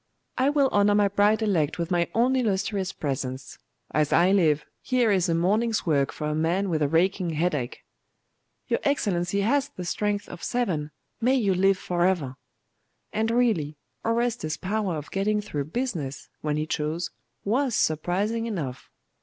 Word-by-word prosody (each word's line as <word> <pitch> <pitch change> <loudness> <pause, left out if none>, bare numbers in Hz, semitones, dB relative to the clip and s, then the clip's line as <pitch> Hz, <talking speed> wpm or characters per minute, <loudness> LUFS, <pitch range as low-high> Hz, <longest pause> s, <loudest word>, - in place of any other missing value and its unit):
I 260 +2 +2
will 285 -2 +3
honour 205 -1 +3
my 205 -1 +4
bride 205 +3 +3
elect 165 -8 +1
with 170 0 -3
my 175 -1 +1
own 245 +3 +3
illustrious 200 -5 0
presence. 130 -2 -4 0.3
As 150 -1 +1
I 175 +3 +5
live, 155 -7 +3 0.2
here 245 -4 +2
is 185 -2 +2
a 165 - +2
morning's 210 +6 +1
work 140 -5 +2
for 150 - -5
a 150 - -1
man 175 +5 0
with 155 -2 0
a 145 - +3
racking 175 +2 +1
headache!' 150 -6 -1 0.8
'Your - - +1
Excellency 200 -9 0
has 280 +7 +1
the 180 - -7
strength 205 +3 -1
of 175 - -10
seven. 180 -12 -1 0.3
May 255 +3 +3
you 210 -7 +2
live 195 +1 +3
for 175 -1 -1
ever!' 170 -8 +1 0.8
And 220 +1 0
really, 215 -12 +1 0.3
Orestes's 230 -8 0
power 200 -2 -1
of 150 0 -7
getting 210 +2 +1
through 150 -9 -3
business, 155 - -4
when 150 -1 -1
he 155 - -1
chose, 155 +2 -2 0.3
was 245 +3 +1
surprising 195 +9 0
enough. 150 - -5
190 Hz, 160 wpm, -26 LUFS, 155-220 Hz, 0.8 s, I